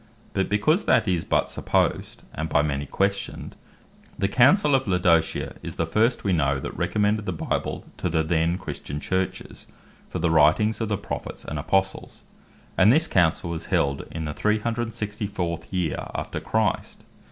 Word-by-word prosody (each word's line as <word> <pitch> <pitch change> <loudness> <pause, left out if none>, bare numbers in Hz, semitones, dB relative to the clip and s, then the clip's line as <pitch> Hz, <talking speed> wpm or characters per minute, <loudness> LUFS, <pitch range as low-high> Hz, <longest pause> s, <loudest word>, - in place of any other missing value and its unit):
But 95 -1 0
because 110 - +2
that - - +3
is 90 -3 +1
but - - +1
supposed, - - -1
and 80 0 -3
by 75 - +3
many 70 -1 -2
questioned, 100 +5 -2 0.6
the 100 - +1
Councell 140 - +4
of 135 -3 +2
Laodicea 90 -3 +1
is - - -7
the 85 - 0
first 110 +9 +1
we 95 - +1
know, 70 -4 +1
that - - -6
recommended 105 +4 0
the - - 0
Bible 80 - -3
to 90 - -2
the 80 -1 +1
then 80 +2 +1
Christian 75 -5 -6
Churches, 95 +3 -3 0.4
for - - -4
the 85 - +1
Writings 80 +9 +4
of 110 - -1
the 105 - 0
Prophets - - -6
and 75 - -4
Apostles: 95 +5 -1 0.6
and 100 +4 +7
this 160 +5 +3
Councell 85 -1 +2
was 80 - -5
held 70 0 0
in 80 -1 -5
the 75 - -3
364. 105 -4 -2
yeer 90 -4 -2
after - - -3
Christ. - - -1
95 Hz, 165 wpm, -25 LUFS, 80-105 Hz, 0.6 s, and